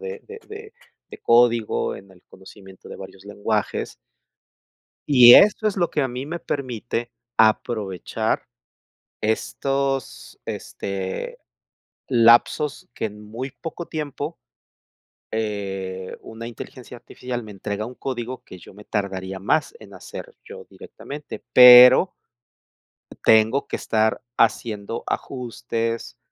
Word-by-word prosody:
de 465 0 -7
de 450 +1 -10
de 430 +1 -10 0.4
de - - -10
código, 120 -2 +2
en 95 0 -13
el 90 -1 -20
conocimiento 95 0 -15
de - - -9
varios 95 0 -12
lenguajes. 105 +1 -2 1.2
Y 125 -3 +10
esto 210 +1 +5
es 200 - -7
lo 175 -2 +1
que 150 - -1
a 135 - 0
mí 125 +2 -5
me 170 +4 -4
permite 120 -5 -4 0.2
aprovechar 110 -1 0 0.8
estos, 135 +5 -2
este, 95 - -5 0.7
lapsos 120 +4 +3
que - - -3
en 105 0 -8
muy 120 +5 -6
poco 170 +1 -8
tiempo, 150 -4 -5 1.0
eh, 95 -4 -4
una 115 +1 -9
inteligencia 120 +1 -10
artificial 120 0 -7
me 110 - -11
entrega 105 +2 -5
un 125 +1 -10
código, 125 -1 -5
que 90 - -12
yo - - -15
me 105 +2 -14
tardaría 95 -2 -4
más 150 - 0
en - - -14
hacer, 485 0 -10
yo 465 0 -11
directamente, 145 +1 -10
pero 125 +7 +9 1.1
tengo 110 +5 +4
que - - -3
estar 110 0 0 0.2
haciendo 110 0 0
ajustes, 115 - -4
115 Hz, 120 wpm, -22 LUFS, 105-135 Hz, 1.2 s, Y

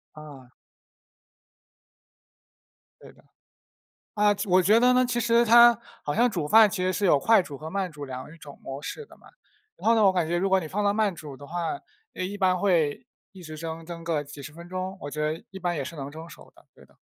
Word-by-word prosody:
哦。 140 -5 -13 2.5
对 - - -14
的。 - - -24 0.9
啊， 205 0 +3
其 205 - -5
我 185 +1 +5
觉 210 +5 +4
得 250 +1 +4
呢， 255 0 +3
其 240 -1 -1
实 235 0 +3
它 235 +1 +7 0.2
好 145 - -2
像 240 +3 +3
煮 170 -8 -3
饭 220 +1 +7
其 185 -2 -3
实 185 - +1
是 200 +3 -1
有 150 - +5
快 225 +2 +4
煮 145 -5 -9
和 155 +2 -8
慢 190 -2 -3
煮 145 -1 -9
2 130 -1 -7
种 145 -2 -13
模 135 +2 -7
式 450 - -7
的 - - -18
嘛。 - - -20 0.5
然 - - -5
后 230 - +5
的 220 - +3
呢， - - +5
我 190 - +6
感 175 -3 0
觉 175 +1 0
如 195 +2 0
果 190 0 +4
你 160 - -6
放 205 +5 -2
到 200 0 +2
慢 210 -4 0
煮 145 -4 -10
的 145 - -12
话， 175 - -3 0.3
呃， - - -4
一 200 +2 -5
般 185 -2 +2
会 175 - +1 0.3
一 190 -2 -14
直 155 -1 -9
蒸， 165 0 -7
蒸 170 -1 -8
个 160 -3 -1
几 145 0 -11
十 155 - -9
分 170 +1 -12
钟， 185 +1 -5
我 145 - -6
觉 150 +1 -5
得 155 +2 -2
一 190 - -9
般 175 -1 -2
也 140 - -3
是 165 +5 -8
能 140 0 -7
蒸 160 +2 -10
熟 - - -15
的， - - -22
对 - - -18
的。 - - -28
180 Hz, 255 characters per minute, -26 LUFS, 155-205 Hz, 2.5 s, 它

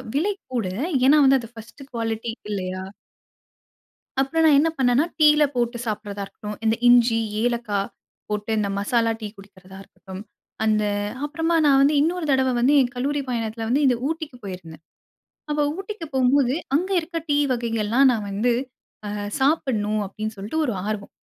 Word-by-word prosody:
விலை 395 +8 +1 0.2
கூட. 225 -6 -1 0.4
ஏன்னா 295 +3 +6
வந்து 270 0 +5
அது 230 - -10
ஃபர்ஸ்ட்டு 230 +5 -12
குவாலிட்டி 225 0 -3 0.2
இல்லையா! 185 -1 -3 1.4
அப்புறம் 320 +4 +1
நான் 290 -2 +6
என்ன 325 +1 +2
பண்ணேன்னா, 255 +3 +3 0.2
டீல 300 0 +6
போட்டு 240 0 -1
சாப்பிடறதா 205 -1 -4
இருக்கட்டும், 210 +1 -8
இந்த 220 0 +3
இஞ்சி, 240 -2 +5 0.2
ஏலக்கா 235 -4 0 0.5
போட்டு 210 +1 -3
இந்த 205 -1 0
மசாலா 230 +2 +1
டீ 210 - -4
குடிக்கிறதா 190 -1 -15
இருக்கட்டும், 190 +1 -11 0.4
அந்த 215 -1 +2 0.4
அப்புறமா 325 +3 0
நான் 275 -1 +5
வந்து 290 +2 +4
இன்னொரு 335 +1 0
தடவ 265 -1 +3
வந்து 265 +4 +4
என் 245 -1 0
கல்லூரி 285 +3 -1
பயணத்தில 225 -2 -3
வந்து 280 +4 +2
இந்த 250 -2 +3
ஊட்டிக்கு 315 -5 -5
போயிருந்தேன். 165 -4 -9 0.7
அப்போ 295 0 +1 0.2
ஊட்டிக்கு 390 -4 -6
போம்போது, 260 0 +3 0.2
"அங்க 365 +6 +1
இருக்க 330 +1 -5
டீ 290 - +2 0.2
வகைகள்லாம் 235 +2 +2
நான் 215 -3 -3
வந்து, 225 +5 +1 0.5
அ - - -3 0.3
சாப்பிடணும்" 225 -8 +1
அப்டின்னு 215 +2 -6
சொல்ட்டு 215 +11 -4
ஒரு 240 - -1
ஆர்வம் 210 -2 -4
240 Hz, 150 wpm, -23 LUFS, 210-285 Hz, 1.4 s, ஏன்னா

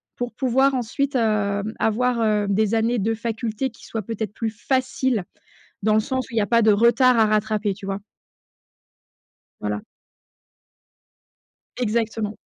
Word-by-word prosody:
pour 245 -1 -4
pouvoir 265 +3 +2
ensuite, 265 +2 -1
heu, 210 -3 +1 0.2
avoir, 235 +2 +1
heu, 210 -2 +2
des 210 +2 +1
années 230 +2 +1
de 225 +3 0
faculté 225 +2 -3
qui - - -16
soient, 225 - -4
peut-être, 220 0 -4
plus 225 0 -2
faciles, 255 -2 -1 0.6
dans 215 +1 +3
le 215 - +5
sens 260 +2 -2
où - - -14
il - - -2
y - - +4
a - - +1
pas 235 -1 +4
de 215 -1 +5
retard 235 +3 +4
à 220 - +6
rattraper, 215 -1 +1
tu 195 0 -11
vois? 195 0 -3 1.6
Voilà. - - -3 1.9
Exactement. 220 -2 -1
225 Hz, 150 wpm, -23 LUFS, 215-245 Hz, 1.9 s, à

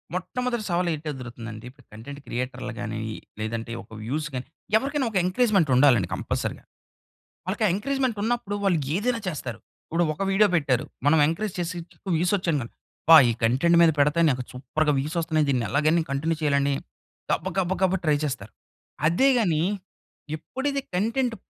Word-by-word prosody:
మొట్టమొదటి 240 +6 -2
సవాలు 175 0 +1
ఏంటి 155 0 -6
ఎదురవుతుందంటే 120 -4 -8
ఇప్పుడు 130 -1 -20
కంటెంట్ 140 +6 -9
క్రియేటర్లు 125 0 -4
గానీ, 110 -2 -4 0.4
లేదంటే 115 +1 -3
ఒక - - -23
వ్యూస్ 150 +7 -2
గాని, 125 -1 -4 0.3
ఎవరికైనా 275 +3 -1
ఒక 205 - 0
ఎంకరేజ్‌మెంట్ 190 - +2
ఉండాలండి 125 -8 +5
కంపల్సరీగా. - - -3 0.8
ఆళ్ళకి 200 +4 -1
ఆ - - +2
ఎంకరేజ్‌మెంట్ 260 +1 -1
ఉన్నప్పుడు 225 -3 -1
వాళ్ళు 185 -5 +3 0.2
ఏదైనా 230 +4 0
చేస్తారు. 130 -9 -4 0.3
ఇప్పుడు 170 +2 0
ఒక 170 - -3
వీడియో 210 +2 +5
పెట్టారు. 140 -6 +1 0.2
మనం 155 +2 +5
ఎంకరేజ్ 180 +5 -2
చేసిచ్ 175 -1 -3
చుట్టూ 195 - -10
వ్యూస్ 175 +4 +1
వచ్చాయిమ 165 -6 0
అబ్బా! 160 +6 +2
ఈ - - +3
కంటెంట్ 135 +9 +4
మీద 165 -1 +6
పెడతే 150 +3 +3
నాకు 125 -1 -2
సూపర్‌గా 150 +4 0
వ్యూస్ 150 +5 -3
వస్తన్నాయి. 155 -2 +1
దీన్ని 125 -4 +1
ఎలాగైనా 155 +3 +2
కంటిన్యూ 155 +4 0
చెయ్యాలని 140 -1 +2 0.6
గబ, - - 0
గబ, 185 -1 +1
గబా 190 0 +3
ట్రై 150 -1 +3
చేస్తారు. 110 -8 -4 0.6
అదే 175 +12 +3
గానీ 165 -8 +2 0.7
ఎప్పుడైతే 275 - -3
కంటెంట్ 230 +5 0
160 Hz, 155 wpm, -25 LUFS, 135-195 Hz, 0.8 s, మీద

